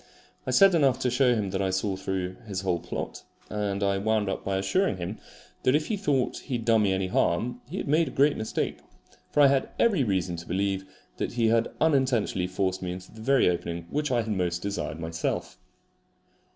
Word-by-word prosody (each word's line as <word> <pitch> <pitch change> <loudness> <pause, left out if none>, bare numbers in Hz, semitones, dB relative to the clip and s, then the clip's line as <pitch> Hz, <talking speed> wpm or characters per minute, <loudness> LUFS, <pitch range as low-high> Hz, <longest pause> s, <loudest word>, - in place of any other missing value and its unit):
I - - -1
said 195 -1 +6
enough 140 -7 +4
to 125 - +1
show 125 -1 +3
him 100 -4 -2
that 95 0 -1
I 95 - +1
saw 95 +1 0
through 95 -1 -3
his 95 -2 -3
whole 90 -3 0
plot; - - -5 0.3
and 100 -1 -1
I 100 0 +1
wound 110 0 +1
up - - -3
by 95 0 -1
assuring 100 - +1
him 90 +4 -5 0.4
that 130 - +3
if 150 0 0
he 220 - +1
thought 145 -10 0
he 130 - -4
had 115 -2 -4
done 115 -2 +4
me 100 -2 +2
any 95 0 0
harm 115 +6 0
he 180 - -5
had - - -3
made 155 +3 +3
a - - -2
great 140 +3 +3
mistake; 110 0 -2 0.5
for 150 - +2
I 140 - +8
had 135 -1 +1
every 205 -12 +3
reason 95 -5 -1
to 85 - -9
believe 95 +1 -1 0.3
that - - -3
he 115 -2 +2
had 115 0 +2
unintentionally 130 - +2
forced 95 0 -1
me 90 -1 -3
into 90 0 -10
the 110 - -12
very 135 +3 +3
opening 85 -1 -2
which 150 0 -1
I 120 -2 +2
had 110 - -6
most 90 -2 -1
desired 100 -5 -3
myself. 80 0 -3
105 Hz, 215 wpm, -27 LUFS, 95-130 Hz, 0.5 s, I